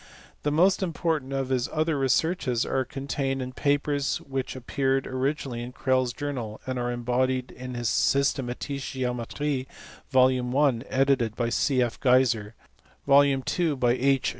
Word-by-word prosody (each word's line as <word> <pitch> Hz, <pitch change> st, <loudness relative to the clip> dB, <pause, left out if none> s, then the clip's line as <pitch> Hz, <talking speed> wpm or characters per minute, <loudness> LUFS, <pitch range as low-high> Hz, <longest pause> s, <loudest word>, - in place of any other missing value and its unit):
The 150 Hz, -, 0 dB
most 180 Hz, +7 st, +3 dB
im 180 Hz, -3 st, -1 dB
portant 155 Hz, -5 st, -1 dB
of 135 Hz, -1 st, -2 dB
his 125 Hz, -2 st, 0 dB
other 155 Hz, 0 st, 0 dB
researches 135 Hz, -2 st, +1 dB
are 130 Hz, -, 0 dB
contained 135 Hz, 0 st, -3 dB
in 130 Hz, 0 st, -5 dB
papers 145 Hz, 0 st, 0 dB
which 135 Hz, -1 st, -4 dB
appeared 135 Hz, +1 st, 0 dB
originally 130 Hz, -2 st, -2 dB
in 120 Hz, +1 st, -7 dB
Crelle 130 Hz, -1 st, +1 dB
s 120 Hz, -, -3 dB
Journal, 125 Hz, -6 st, -5 dB
and 130 Hz, -1 st, -3 dB
are 120 Hz, 0 st, -1 dB
embodied 125 Hz, +1 st, -1 dB
in 125 Hz, 0 st, -8 dB
his 120 Hz, -1 st, -2 dB
tiynthetische 135 Hz, +1 st, 0 dB
Geometric, 130 Hz, +2 st, -2 dB, 0.4 s
vol. 130 Hz, -1 st, +3 dB
I. 140 Hz, -6 st, +3 dB
edited 130 Hz, -4 st, +2 dB
by 120 Hz, -1 st, -1 dB
C. 130 Hz, +2 st, +2 dB
F. 120 Hz, -, -4 dB
Geiser, 125 Hz, -4 st, +2 dB, 0.5 s
vol. 140 Hz, 0 st, +7 dB
ii. 145 Hz, +4 st, 0 dB
by 125 Hz, -2 st, +2 dB
H. 135 Hz, +2 st, +2 dB
130 Hz, 155 wpm, -26 LUFS, 125-140 Hz, 0.5 s, vol